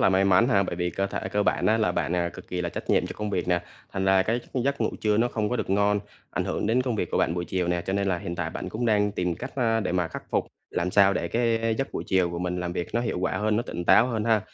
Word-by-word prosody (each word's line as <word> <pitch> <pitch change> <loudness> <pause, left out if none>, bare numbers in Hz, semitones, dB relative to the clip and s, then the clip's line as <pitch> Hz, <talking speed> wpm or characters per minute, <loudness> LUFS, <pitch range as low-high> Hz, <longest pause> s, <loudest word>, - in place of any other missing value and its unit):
là - - +5
may 95 +1 +3
mắn 100 +6 +4
ha, 100 -5 +4
bởi 85 - -3
vì 90 0 -1
cơ 95 +2 -1
thể - - -4
của 105 0 +2
bạn - - +1
á 110 +1 +3
là 110 - +2
bạn, 90 - -1
à, 85 0 +1
cực - - -12
kì 90 -1 -3
là 85 - -1
trách - - -5
nhiệm - - +3
cho - - -6
công 105 -1 -3
việc 90 -2 -1
nè, 90 -1 +2 0.3
thành 95 0 -1
ra 95 0 +5
cái 115 +5 0
gi 125 - +1
giấc 140 -2 0
ngủ 110 - +1
trưa 105 -1 +2
nó 120 +2 +3
không 105 -3 -1
có 125 - -1
được 95 - -3
ngon, 100 +1 +3 0.3
ảnh - - -1
hưởng - - -2
đến 125 +3 +2
công 125 -4 -1
việc 90 - -2
của - - 0
bạn 85 - +2
buổi 85 0 -2
chiều 90 -1 -1
nè, 85 -1 0
cho 95 - -1
nên 100 0 0
là 90 -2 +1
hiện 85 -3 -5
tại - - -2
bạn - - -5
cũng 120 +2 -2
đang 105 -2 +2
tìm 90 -3 -1
cách, - - -7
a, 115 -3 +2
để 95 - -2
mà 90 -2 0
khắc - - -7
phục, - - 0 0.2
làm 90 +2 -1
sao 100 0 +5
để 85 - -2
cái 115 -1 +1
giấc 135 - -2
buổi - - -4
chiều 90 -2 +2
của 85 - -4
mình 90 0 -2
làm 90 -1 -3
việc 85 - -3
nó 120 - +2
hiệu 115 -6 -2
quả 95 - 0
hơn, 105 +1 +1
nó 120 - +1
tỉnh 85 - -5
táo 120 - +6
hơn 110 -3 -2
ha. 110 -2 +3
100 Hz, 330 wpm, -26 LUFS, 90-110 Hz, 0.3 s, táo